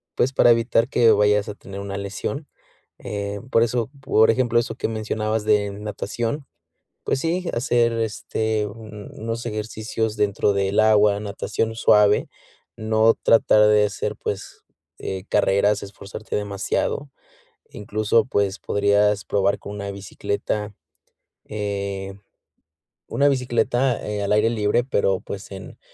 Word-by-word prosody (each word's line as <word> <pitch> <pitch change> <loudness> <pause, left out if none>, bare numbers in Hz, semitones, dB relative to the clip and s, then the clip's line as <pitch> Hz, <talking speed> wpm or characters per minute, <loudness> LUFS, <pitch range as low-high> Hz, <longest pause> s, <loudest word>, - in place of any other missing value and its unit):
pues, 130 +2 +1
para 125 - +5
evitar 115 0 +2
que 115 -4 +5
vayas 105 0 +3
a - - -4
tener 100 -1 -9
una 100 0 -5
lesión. 100 +9 -4 0.5
Em, 100 +3 -5
por 115 - +3
eso, 120 0 -1
por 110 -4 +4
ejemplo, 120 0 +1
eso 120 - -3
que - - -2
mencionabas 110 0 -2
de 105 -1 +2
natación, 105 +6 -4 0.6
pues 135 - 0
sí, 170 +3 -1
hacer, 120 -1 +2
este, 110 -1 -1
un 105 -1 -10
unos 115 +1 -4
ejercicios 110 0 -3
dentro 105 0 +1
del 100 +1 +2
agua, 105 -1 +4
natación 105 +2 -3
suave, 105 -2 +4 0.5
no 110 +1 +3
tratar 105 -1 +5
de 105 0 +5
hacer, 100 -1 -4
pues, - - -6 0.3
eh, 95 -1 -5
carreras, 100 0 +2
esforzarte 100 0 -9
demasiado. 105 +7 -2 0.6
Incluso, 105 +1 +1
pues, 100 -4 0
podrías 100 0 +2
probar 100 0 +1
con 100 - -8
una 100 -1 -5
bicicleta, 100 +1 -4 0.7
eh, 100 -2 -4 1.0
una 140 - +3
bicicleta, 125 -1 +1
eh, 105 -1 -2
al 100 - -2
aire 105 +2 +3
libre, 110 +1 +1
pero, 100 -6 +1
pues, 100 0 -8
en 95 -1 -10
105 Hz, 130 wpm, -22 LUFS, 100-115 Hz, 1.0 s, para